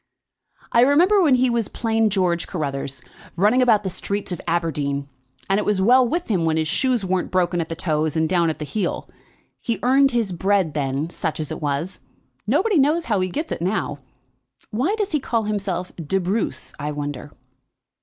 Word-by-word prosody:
"I 235 Hz, -, +5 dB
remember 345 Hz, +10 st, +5 dB
when 295 Hz, -7 st, +5 dB
he 255 Hz, +1 st, +3 dB
was 235 Hz, -3 st, 0 dB
plain 225 Hz, -1 st, 0 dB
George 180 Hz, -4 st, 0 dB
Carruthers, 140 Hz, -5 st, -4 dB, 0.3 s
running 210 Hz, +8 st, +3 dB
about 225 Hz, -4 st, +4 dB
the 190 Hz, -, -3 dB
streets 200 Hz, +2 st, -3 dB
of 175 Hz, -, -4 dB
Aberdeen, 145 Hz, -4 st, -1 dB, 0.4 s
and 195 Hz, +1 st, +2 dB
it -, -, -1 dB
was 210 Hz, -2 st, +1 dB
well 245 Hz, +6 st, +5 dB
with 340 Hz, +7 st, -1 dB
him 190 Hz, -7 st, +1 dB
when 160 Hz, -1 st, +1 dB
his 160 Hz, -1 st, 0 dB
shoes 245 Hz, -, +1 dB
weren't 185 Hz, -1 st, -1 dB
broken 175 Hz, -1 st, +1 dB
at 160 Hz, -, -5 dB
the 165 Hz, -, -3 dB
toes 155 Hz, -2 st, -1 dB
and 160 Hz, 0 st, +2 dB
down 170 Hz, -1 st, +2 dB
at 160 Hz, -, -4 dB
heel. 175 Hz, +5 st, -3 dB, 0.5 s
He 230 Hz, -3 st, -2 dB
earned 270 Hz, +2 st, +5 dB
his 235 Hz, -6 st, 0 dB
bread 190 Hz, -2 st, +1 dB
then, 140 Hz, +2 st, -2 dB
such 160 Hz, -, -3 dB
as 155 Hz, -3 st, -3 dB
it -, -, -5 dB
was; 145 Hz, +5 st, -2 dB, 0.5 s
nobody 410 Hz, -5 st, +2 dB
knows 310 Hz, +5 st, +2 dB
how 210 Hz, -4 st, +1 dB
he 185 Hz, 0 st, 0 dB
gets 305 Hz, -, -4 dB
it -, -, -3 dB
now. 190 Hz, +5 st, -1 dB, 0.7 s
Why 265 Hz, -, 0 dB
does 415 Hz, -2 st, -1 dB
he 305 Hz, -, +2 dB
call 230 Hz, -4 st, -1 dB
himself 195 Hz, -4 st, -3 dB
de 170 Hz, +3 st, -1 dB
Bruce, 185 Hz, -, -2 dB
I 150 Hz, +1 st, -3 dB
wonder?" 145 Hz, -1 st, -5 dB
190 Hz, 190 wpm, -22 LUFS, 160-235 Hz, 0.7 s, I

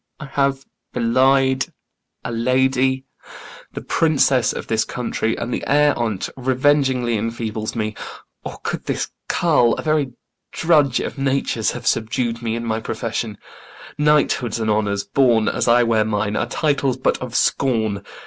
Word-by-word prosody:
I 150 Hz, -, -7 dB
have 140 Hz, -1 st, -1 dB, 0.3 s
belied 130 Hz, +2 st, +2 dB, 0.6 s
a -, -, -4 dB
lady, 130 Hz, +2 st, +1 dB, 0.7 s
The -, -, -6 dB
Princess 140 Hz, -5 st, +2 dB
of -, -, -6 dB
this 110 Hz, -1 st, +1 dB
country, 115 Hz, -2 st, -2 dB
and 120 Hz, +1 st, -4 dB
the -, -, -3 dB
air 145 Hz, 0 st, +4 dB
on't 110 Hz, -5 st, -2 dB
Revengingly 130 Hz, -2 st, +1 dB
enfeebles 110 Hz, 0 st, -3 dB
me; 110 Hz, -1 st, -2 dB, 0.5 s
or -, -, -7 dB
could -, -, -4 dB
this -, -, -2 dB, 0.2 s
carl, 120 Hz, -1 st, +3 dB
A -, -, -6 dB
very 155 Hz, -5 st, 0 dB, 0.4 s
drudge 150 Hz, -6 st, +2 dB
of -, -, -5 dB
nature's, 135 Hz, -4 st, 0 dB
have 120 Hz, -1 st, -8 dB
subdu'd 115 Hz, +1 st, 0 dB
me 115 Hz, -1 st, -2 dB
In 115 Hz, 0 st, -4 dB
my 110 Hz, -1 st, -1 dB
profession? 115 Hz, -2 st, -4 dB, 0.6 s
Knighthoods 150 Hz, -6 st, +2 dB
and 110 Hz, -1 st, 0 dB
honours 100 Hz, -1 st, 0 dB
borne 115 Hz, +1 st, +2 dB
As -, -, 0 dB
I 120 Hz, +1 st, +5 dB
wear 115 Hz, -2 st, +2 dB
mine 105 Hz, -1 st, -1 dB
are 120 Hz, -, 0 dB
titles 140 Hz, -1 st, 0 dB
but 130 Hz, -, 0 dB
of 125 Hz, -2 st, -6 dB
scorn. 110 Hz, -7 st, +1 dB
120 Hz, 150 wpm, -20 LUFS, 115-135 Hz, 0.7 s, I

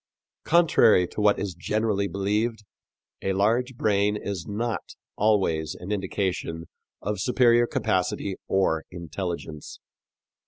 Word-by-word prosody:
Contrary 155 Hz, -, +5 dB
to 105 Hz, -, -5 dB
what 105 Hz, -1 st, +4 dB
is 100 Hz, -2 st, -3 dB
generally 100 Hz, +3 st, 0 dB
believed, 105 Hz, +4 st, -1 dB, 0.6 s
a 95 Hz, -, 0 dB
large 115 Hz, +6 st, +1 dB
brain 105 Hz, -2 st, +1 dB
is 95 Hz, -4 st, -5 dB
not 115 Hz, +2 st, -3 dB, 0.2 s
always 95 Hz, -8 st, +1 dB
an 90 Hz, +3 st, -7 dB
indication 95 Hz, -4 st, -2 dB, 0.4 s
of 105 Hz, -1 st, -2 dB
superior 120 Hz, 0 st, +4 dB
capacity 100 Hz, -4 st, -1 dB
or 80 Hz, -5 st, +1 dB
intelligence. 85 Hz, -3 st, -6 dB
100 Hz, 110 wpm, -26 LUFS, 90-110 Hz, 0.6 s, Contrary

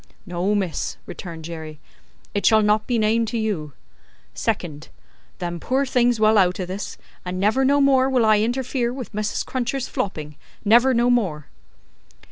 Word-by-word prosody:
"No, 180 Hz, +3 st, -1 dB
miss," 190 Hz, -5 st, -2 dB
returned 165 Hz, -3 st, -8 dB
Jerry, 160 Hz, -2 st, -7 dB, 0.5 s
"it 205 Hz, -, -1 dB
shall 220 Hz, -1 st, +5 dB
not 210 Hz, +1 st, +2 dB
be 245 Hz, -, +1 dB
named 225 Hz, +1 st, +2 dB
to 235 Hz, -, -2 dB
you. 190 Hz, -10 st, -2 dB, 0.6 s
Second: 155 Hz, -2 st, -3 dB, 0.5 s
them 175 Hz, -1 st, -4 dB
poor 265 Hz, +9 st, 0 dB
things 245 Hz, -3 st, +2 dB
well 215 Hz, 0 st, +5 dB
out 185 Hz, -1 st, +2 dB
o' 185 Hz, -, -2 dB
this, 190 Hz, +3 st, -6 dB, 0.3 s
and 180 Hz, 0 st, -4 dB
never 215 Hz, +7 st, +2 dB
no 280 Hz, +2 st, +3 dB
more 270 Hz, -1 st, +4 dB
will 250 Hz, -4 st, +3 dB
I 215 Hz, -1 st, +5 dB
interfere 240 Hz, +2 st, -1 dB
with 255 Hz, -3 st, -7 dB
Mrs. 210 Hz, 0 st, -2 dB
Cruncher's 255 Hz, 0 st, -2 dB
flopping, 150 Hz, -6 st, -4 dB, 0.3 s
never 240 Hz, +5 st, +5 dB
no 240 Hz, +1 st, +3 dB
more!" 180 Hz, -12 st, 0 dB
215 Hz, 160 wpm, -22 LUFS, 180-245 Hz, 0.6 s, shall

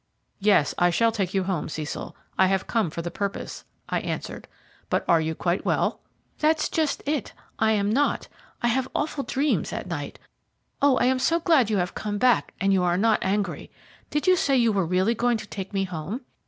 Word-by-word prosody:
"Yes, 195 Hz, -7 st, +3 dB
I 175 Hz, 0 st, +5 dB
shall 225 Hz, +7 st, +3 dB
take 195 Hz, -4 st, -2 dB
you 190 Hz, -, +2 dB
home, 185 Hz, -4 st, -2 dB
Cecil. 155 Hz, -1 st, -5 dB, 0.2 s
I 190 Hz, -, +4 dB
have 190 Hz, 0 st, 0 dB
come 220 Hz, -7 st, 0 dB
for 165 Hz, +2 st, -5 dB
the 175 Hz, -, -4 dB
purpose," 200 Hz, -1 st, -4 dB, 0.2 s
I -, -, 0 dB
answered; -, -, -5 dB, 0.4 s
"but -, -, 0 dB
are 165 Hz, -1 st, +4 dB
you 160 Hz, 0 st, -2 dB
quite 175 Hz, +4 st, -1 dB
well?" -, -, 0 dB, 0.4 s
"That's 310 Hz, 0 st, +2 dB
just 315 Hz, -3 st, 0 dB
it; 290 Hz, -5 st, -2 dB, 0.3 s
I 220 Hz, 0 st, +3 dB
am 205 Hz, -1 st, +1 dB
not. 285 Hz, +6 st, +1 dB, 0.4 s
I 240 Hz, -, +3 dB
have 255 Hz, +2 st, +1 dB
awful 295 Hz, -1 st, -1 dB
dreams 280 Hz, +3 st, 0 dB
at -, -, -4 dB
night. -, -, -5 dB, 0.6 s
Oh, 280 Hz, -2 st, +5 dB
I -, -, +2 dB
am 255 Hz, 0 st, +2 dB
so 330 Hz, +6 st, +2 dB
glad 315 Hz, -, +3 dB
you 215 Hz, -, +1 dB
have 180 Hz, -1 st, -1 dB
come 205 Hz, -1 st, -3 dB
back 250 Hz, +3 st, +3 dB
and 195 Hz, +1 st, +2 dB
you 190 Hz, -, +3 dB
are 175 Hz, 0 st, +2 dB
not 220 Hz, +2 st, +3 dB
angry. 200 Hz, +1 st, -1 dB, 0.4 s
Did 295 Hz, +3 st, -1 dB
you 370 Hz, -1 st, +6 dB
say 275 Hz, -6 st, +2 dB
you 235 Hz, -2 st, +4 dB
were 195 Hz, -5 st, 0 dB
really 185 Hz, +6 st, +2 dB
going 240 Hz, 0 st, +1 dB
to 215 Hz, -, -8 dB
take 195 Hz, -2 st, -6 dB
me 195 Hz, -1 st, 0 dB
home?" 185 Hz, -, -5 dB
210 Hz, 210 wpm, -25 LUFS, 185-255 Hz, 0.6 s, you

